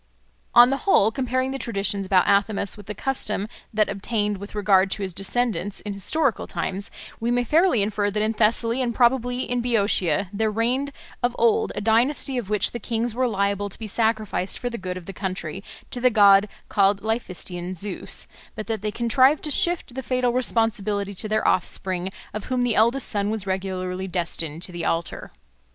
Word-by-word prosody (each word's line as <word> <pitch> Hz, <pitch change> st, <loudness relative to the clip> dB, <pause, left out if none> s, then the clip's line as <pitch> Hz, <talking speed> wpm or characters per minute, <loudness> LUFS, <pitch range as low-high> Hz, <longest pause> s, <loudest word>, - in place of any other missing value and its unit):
On 245 Hz, +2 st, +8 dB
the 275 Hz, -, +1 dB
whole, 220 Hz, -, +5 dB
comparing 255 Hz, +1 st, -1 dB
the 270 Hz, -, -4 dB
traditions 200 Hz, -4 st, -1 dB
about 185 Hz, -1 st, +3 dB
Athamas 200 Hz, 0 st, +1 dB
with 205 Hz, -2 st, -13 dB
the 210 Hz, -, -5 dB
custom 215 Hz, -6 st, -2 dB, 0.2 s
that 215 Hz, -2 st, +2 dB
obtained 205 Hz, +1 st, -1 dB
with 200 Hz, +2 st, -9 dB
regard 195 Hz, -2 st, +3 dB
to 200 Hz, +1 st, -3 dB
his 190 Hz, -2 st, -4 dB
descendants 205 Hz, +1 st, -1 dB
in 205 Hz, -, -5 dB
historical 255 Hz, +6 st, 0 dB
times, 195 Hz, +1 st, -3 dB, 0.3 s
we 230 Hz, -, -1 dB
may 245 Hz, 0 st, +2 dB
fairly 310 Hz, -, +3 dB
infer 205 Hz, 0 st, 0 dB
that 210 Hz, +1 st, -1 dB
in 220 Hz, +1 st, 0 dB
Thessaly 230 Hz, +3 st, +2 dB
and 240 Hz, -2 st, -1 dB
probably 245 Hz, 0 st, +2 dB
in 245 Hz, 0 st, -1 dB
Boeotia 200 Hz, -7 st, +1 dB
there 220 Hz, +2 st, 0 dB
reigned 245 Hz, +6 st, 0 dB, 0.3 s
of 245 Hz, 0 st, 0 dB
old 230 Hz, -1 st, +2 dB
a -, -, -3 dB
dynasty 245 Hz, +4 st, +2 dB
of 210 Hz, -5 st, -7 dB
which 210 Hz, -1 st, +1 dB
the 240 Hz, -, -5 dB
kings 230 Hz, +1 st, -2 dB
were 255 Hz, +2 st, +1 dB
liable 200 Hz, -1 st, -1 dB
to -, -, -7 dB
be 225 Hz, -, -7 dB
sacrificed 215 Hz, -3 st, 0 dB
for 245 Hz, -, -4 dB
the 235 Hz, -, -5 dB
good 185 Hz, -1 st, -4 dB
of 180 Hz, -, -9 dB
the 195 Hz, -, -7 dB
country 185 Hz, -1 st, -5 dB, 0.3 s
to 245 Hz, -, -5 dB
the 255 Hz, -, +5 dB
god 200 Hz, -2 st, +6 dB, 0.2 s
called 200 Hz, 0 st, +2 dB
Laphystian 185 Hz, -5 st, -3 dB
Zeus, 200 Hz, +2 st, -3 dB, 0.3 s
but 215 Hz, -, -5 dB
that 220 Hz, -3 st, -3 dB
they 210 Hz, -, -1 dB
contrived 255 Hz, +6 st, +3 dB
to 300 Hz, -, -3 dB
shift 345 Hz, -4 st, +2 dB
the 265 Hz, -, -4 dB
fatal 250 Hz, 0 st, 0 dB
responsibility 215 Hz, -5 st, 0 dB
to 210 Hz, +3 st, -2 dB
their 215 Hz, 0 st, +1 dB
offspring, 185 Hz, 0 st, 0 dB, 0.2 s
of 215 Hz, -1 st, -5 dB
whom 255 Hz, -1 st, 0 dB
the 245 Hz, -2 st, +1 dB
eldest 235 Hz, +6 st, +2 dB
son 205 Hz, -1 st, 0 dB
was 215 Hz, -2 st, -2 dB
regularly 190 Hz, -1 st, -3 dB
destined 170 Hz, -3 st, -3 dB
to 185 Hz, -, -2 dB
the 175 Hz, -1 st, -5 dB
altar. 165 Hz, +1 st, -2 dB
215 Hz, 190 wpm, -24 LUFS, 195-240 Hz, 0.3 s, On